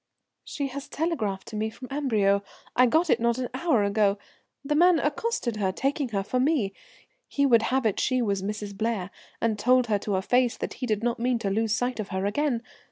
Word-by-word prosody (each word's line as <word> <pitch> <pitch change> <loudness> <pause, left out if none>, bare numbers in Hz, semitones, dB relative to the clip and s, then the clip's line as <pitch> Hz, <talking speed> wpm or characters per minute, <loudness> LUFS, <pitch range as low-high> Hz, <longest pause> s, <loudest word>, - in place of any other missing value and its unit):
"She 280 -2 -4
has 280 +1 -7
telegraphed 225 - -2
to 220 - -8
me 215 +1 -1
from 235 +3 -10
Amberieu; 215 -9 +2 0.3
I 250 0 +6
got 320 +6 +2
it 235 - +3
not 235 +1 +1
an 255 -1 -3
hour 260 -5 +2
ago. 200 0 +2 0.5
The 295 - 0
man 350 +3 +5
accosted 295 - -1
her, 195 -3 0
taking 275 - -1
her 200 -3 -1
for 250 +5 -1
me. 255 -8 +1 0.5
He 280 - +1
would 235 -4 +5
have 265 -1 +1
it 215 - +1
she 255 -1 +1
was 200 -5 0
Mrs. 205 0 -4
Blair, 210 -3 -2 0.3
and 220 -2 0
told 250 +2 +4
her 210 -3 +1
to 205 0 -3
her 190 0 0
face 245 +2 +2
that - - -4
he 250 - -1
did 215 -1 -1
not 235 -1 0
mean 245 +1 +1
to 200 -4 -2
lose 220 +1 +1
sight 245 +1 -2
of 210 - -3
her 190 -1 -2
again. 245 +2 0
235 Hz, 220 wpm, -26 LUFS, 205-265 Hz, 0.5 s, I